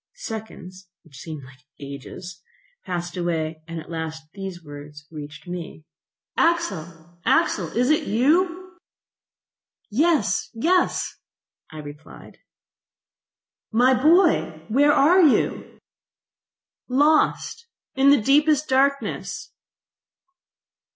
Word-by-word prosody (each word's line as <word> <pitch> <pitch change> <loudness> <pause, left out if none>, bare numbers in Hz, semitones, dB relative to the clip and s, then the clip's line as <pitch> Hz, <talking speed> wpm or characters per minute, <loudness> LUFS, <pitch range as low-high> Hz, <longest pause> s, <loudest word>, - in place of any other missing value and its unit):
Seconds, 200 - -8 0.2
which 150 -6 -16
seemed 155 -5 -8 0.4
ages, 145 +6 -9 0.4
passed 175 0 -4
away, 165 -3 -2
and 165 0 -6
at 160 - -11
last 160 -1 -5
these 190 -3 -7
words 145 0 -11
reached 150 +1 -9
me: 175 -3 -7 0.5
"Axel! 175 - -1
Axel! 260 - +2
is 250 +4 +3
it 310 - +1
you?".... 345 - +1 1.1
"Yes, 245 - +1
yes," 350 +10 +1 0.5
I 155 - -11
replied..... 150 +1 -11 1.3
"My 245 +4 +4
boy, 300 - +3
where 285 +6 +4
are 325 +7 +5
you?".... 310 -6 +2 1.1
"Lost, 305 - +2 0.3
in 270 +1 +4
the 285 -1 +6
deepest 295 +3 +3
darkness." 275 +1 0
205 Hz, 90 wpm, -23 LUFS, -, 1.3 s, the